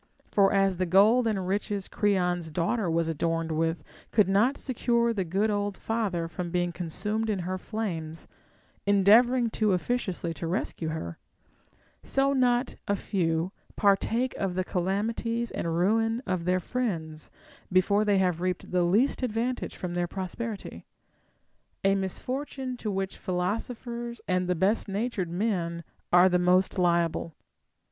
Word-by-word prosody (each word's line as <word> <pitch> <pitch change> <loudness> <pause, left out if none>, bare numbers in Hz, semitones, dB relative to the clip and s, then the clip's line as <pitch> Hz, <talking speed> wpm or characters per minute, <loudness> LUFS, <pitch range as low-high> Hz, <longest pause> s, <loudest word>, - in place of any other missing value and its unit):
For 195 -1 +4
as 195 -2 +2
the 185 0 0
gold 215 +7 +5
and 195 -4 -1
riches 200 0 -2
Creon's 180 -5 0
daughter 175 +5 0
was 165 0 +1
adorned 165 +1 -1
with 165 +1 0 0.3
could 210 -4 +3
not 210 +8 +3
secure 235 -2 +1
the 195 -4 -1
good 195 +5 0
old 205 -1 -1
father 200 -7 -1
from 170 +2 -5
being 175 0 0
consumed 210 +6 -2
in 210 - +1
her 185 +1 -3
flames, 170 -8 -4 0.6
endeavoring 225 +5 +5
too 215 -3 +2
officiously 185 -4 -1
to 165 +2 -5
rescue 170 -2 -2
her; 85 - -5 0.8
so 275 +1 +2
not 250 -1 +2
a 200 - +2
few 170 -3 -1 0.2
partake 225 +5 +2
of 190 -2 -2
the 185 - 0
calamities 220 +6 -1
and 165 0 -2
ruin 225 +6 +2
of 175 -2 -2
their 180 +1 +2
friends, 170 -9 -3 0.4
before 200 +3 +3
they 205 -2 +3
have 180 -3 +1
reaped 180 -1 -2
the 180 0 +2
least 210 +13 +2
advantage 245 +1 -2
from 180 -1 -5
their 175 0 0
pros 185 0 -5
perity; 230 -4 -6 1.0
a 195 0 +4
misfortune 255 +7 -3
to 230 -3 -4
which 195 -1 -3
philosophers 235 +6 -3
and 180 -1 +1
the 180 - +1
best 195 +7 +1
natured 200 -2 -2
men 175 -3 -1 0.3
are 180 +1 +7
the 180 -1 +2
most 185 +2 +3
liable. 170 -2 +1
195 Hz, 145 wpm, -28 LUFS, 175-225 Hz, 1.0 s, are